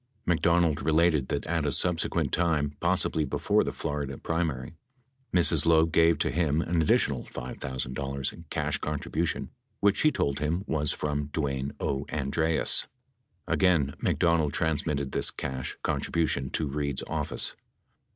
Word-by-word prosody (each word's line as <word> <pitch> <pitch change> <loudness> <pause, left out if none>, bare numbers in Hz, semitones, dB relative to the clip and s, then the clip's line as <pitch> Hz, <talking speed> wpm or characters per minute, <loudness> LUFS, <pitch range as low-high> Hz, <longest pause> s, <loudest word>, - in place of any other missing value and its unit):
McDonald 85 -2 +2
related 80 -3 +2
that - - -2
at 80 -1 -1
a 75 - 0
subsequent 85 +4 +1
time, 75 -4 +1
possibly 80 - +1
'before 70 - +1
the - - -2
Florida 70 -2 -4
primary, 80 -6 -2 0.6
Mi's. 90 -1 +4
Loeb 80 0 +4
gave 80 0 +4
to 75 - 0
him 80 0 +1
an 85 0 0
addi - - +4
tional - - -1
$5,000 65 +4 -5
cash - - -1
contribution 75 +2 -2 0.3
which 100 -1 +3
she 155 - +4
told 70 - -1
him 80 +5 -1
was 75 -5 +1
from 75 -1 -2
Dwayne 70 -2 -2
O. 70 +1 -2
Andreas. 75 +2 +1 0.6
Again 80 -7 +2
McDonald 85 -4 +2
transmitted 75 -3 -1
this - - +5
cash 65 -1 -5
contribution 80 -5 0
to 80 - -1
Reid's 70 -1 -2
office. - - -2
75 Hz, 135 wpm, -28 LUFS, 70-85 Hz, 0.6 s, this